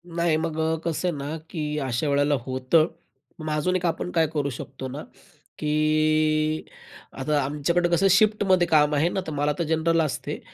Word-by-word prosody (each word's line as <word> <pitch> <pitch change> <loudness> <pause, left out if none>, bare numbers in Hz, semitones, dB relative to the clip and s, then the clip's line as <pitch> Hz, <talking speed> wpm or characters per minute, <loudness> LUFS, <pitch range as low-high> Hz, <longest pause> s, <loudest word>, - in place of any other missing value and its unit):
नाही, 170 -2 +2
मग 160 -1 -3
अ, 160 0 +1
कसं 170 +2 -1
आहे 165 -5 -2
ना 145 +3 -4
की 150 -3 -3
अशावेळेला 145 +3 +1
होतं. 130 +5 +2 0.5
मग 155 0 -5
अजून 180 +5 0
एक 180 -1 -1
आपण 170 +1 -2
काय 165 -2 +2
करू 145 -2 0
शकतो 130 +1 -7
ना 140 +4 -7 0.6
की 155 0 +1 0.6
आता 145 +2 +1
आमच्याकडे 150 +5 0
कसं 175 +3 +3
शिफ्टमध्ये 190 -3 +3
काम 150 -2 +3
आहे 160 +4 +2
ना, 190 - -2
तर - - -3
मला 145 +1 +1
तर - - +2
जनरल 165 +1 +1
असते. 150 -5 -3
155 Hz, 170 wpm, -25 LUFS, 150-170 Hz, 0.6 s, कसं